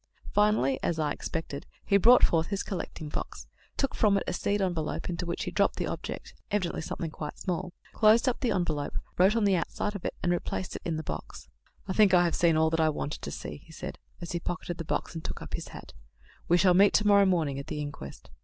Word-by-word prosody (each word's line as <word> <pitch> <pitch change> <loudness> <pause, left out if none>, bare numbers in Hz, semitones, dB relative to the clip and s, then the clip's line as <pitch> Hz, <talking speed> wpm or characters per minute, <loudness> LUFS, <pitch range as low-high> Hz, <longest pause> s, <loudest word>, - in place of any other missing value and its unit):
Finally, 205 -11 +3
as 170 - 0
I 155 -2 0
expected, 160 -3 -5 0.2
he 200 - +2
brought 240 +6 +7
forth 165 -1 +4
his 200 -1 -2
"collecting 170 -4 -5
box," 150 - -5 0.3
took 275 - 0
from 205 -2 +3
it - - -1
a - - -2
seed 200 +3 0
envelope, 175 -3 -2
into 175 +1 -4
which 170 - -2
he - - -4
dropped - - +2
the - - -2
object - - -5 0.2
evidently 190 -5 -1
something 160 0 -4
quite 150 -1 -6
small 180 0 -3 0.2
closed 220 +4 +5
up 250 - +1
the 250 - 0
envelope, 155 -6 -1 0.2
wrote 190 +4 +5
on 230 - +2
the 200 -2 +4
outside 205 +5 -2
of 200 - -6
it, - - -3
and 175 - +2
replaced 175 +1 -2
it - - -6
in 165 -2 -2
the 160 - -4
box. - - -7 0.4
"I 190 - -1
think 200 -2 +5
I 175 - +6
have 170 - 0
seen 165 -2 +3
all 160 0 +3
that 165 - 0
I 160 -1 +4
wanted 150 0 -4
to - - -5
see," - - -6
he 155 +3 -18
said, - - -7 0.2
as 170 - -5
he 170 - -1
pocketed 175 0 -4
the 165 - -4
box - - -2
and 165 -1 -6
took - - -5
up - - -10
his - - -3
hat. - - -11 0.5
"We 175 - +5
shall 180 0 +5
meet 200 +3 +5
to 210 - +3
morrow 200 -1 +6
morning 155 -7 +1
at 140 - -7
the 150 - -4
inquest." 145 - -7
175 Hz, 240 wpm, -29 LUFS, 160-200 Hz, 0.5 s, brought